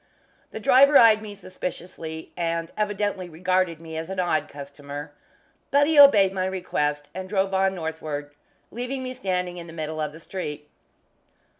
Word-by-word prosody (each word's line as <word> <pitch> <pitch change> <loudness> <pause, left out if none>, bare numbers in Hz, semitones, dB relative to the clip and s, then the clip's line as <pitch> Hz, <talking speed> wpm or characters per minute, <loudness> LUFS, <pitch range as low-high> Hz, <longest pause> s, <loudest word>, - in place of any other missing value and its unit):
The - - -7
driver 275 +6 +6
eyed 220 -2 +7
me 210 -2 -8
suspiciously, 180 -4 -7
and 165 -1 -2
evidently 205 -3 -2
regarded 180 0 0
me 160 -1 -8
as 160 +2 -5
an 190 -1 -4
odd 175 -3 +1
customer, 145 +1 -8 0.6
but 285 +1 +4
he 310 0 +3
obeyed 205 -9 +8
my 185 -1 -1
request, 150 -6 -2
and 185 +1 -6
drove 195 -1 0
on 190 0 +2
northward, 155 -3 -5 0.4
leaving 250 +3 -4
me 255 0 -4
standing 180 -7 -2
in 170 -1 -8
the 165 - -10
middle 155 -1 -4
of 150 - -2
the 160 - -12
street. 150 -5 -6
180 Hz, 160 wpm, -25 LUFS, 160-205 Hz, 0.6 s, obeyed